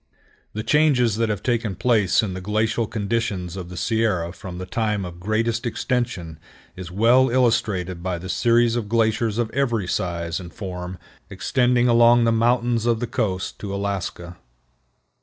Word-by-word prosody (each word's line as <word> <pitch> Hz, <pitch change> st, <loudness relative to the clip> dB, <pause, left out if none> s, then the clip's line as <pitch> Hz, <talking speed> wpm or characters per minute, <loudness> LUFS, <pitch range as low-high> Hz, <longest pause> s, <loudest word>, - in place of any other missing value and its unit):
The 110 Hz, -, -4 dB
changes 130 Hz, -8 st, +3 dB
that 115 Hz, -1 st, +1 dB
have 105 Hz, -3 st, -3 dB
taken 115 Hz, -5 st, -1 dB
place 110 Hz, -4 st, +2 dB
in 100 Hz, -4 st, -3 dB
the 95 Hz, -, -6 dB
glacial 110 Hz, +3 st, 0 dB
conditions 100 Hz, -5 st, -2 dB
of 90 Hz, -2 st, -7 dB
the 90 Hz, -, -8 dB
Sierra 105 Hz, -6 st, 0 dB
from 90 Hz, -2 st, -8 dB
the 90 Hz, -, -5 dB
time 105 Hz, -1 st, -1 dB
of 85 Hz, -1 st, -9 dB
greatest 110 Hz, +4 st, -1 dB
extension 120 Hz, -, -2 dB, 0.4 s
is 90 Hz, -2 st, -8 dB
well 120 Hz, +8 st, +4 dB
illustrated 110 Hz, -8 st, +1 dB
by 90 Hz, 0 st, -2 dB
the 90 Hz, +2 st, -8 dB
series 120 Hz, +3 st, +2 dB
of 110 Hz, -4 st, -3 dB
glaciers 110 Hz, -1 st, +1 dB
of 120 Hz, -2 st, -1 dB
every 120 Hz, -8 st, 0 dB
size 85 Hz, -2 st, -2 dB
and 85 Hz, -2 st, -9 dB
form 90 Hz, -2 st, -6 dB, 0.3 s
extending 120 Hz, +5 st, +1 dB
along 120 Hz, 0 st, +5 dB
the 115 Hz, -, +3 dB
mountains 120 Hz, 0 st, +1 dB
of 115 Hz, -2 st, +2 dB
the 120 Hz, -, -1 dB
coast 110 Hz, -6 st, -2 dB
to 100 Hz, -, -5 dB
Alaska. 95 Hz, -3 st, -4 dB
110 Hz, 160 wpm, -22 LUFS, 95-120 Hz, 0.4 s, along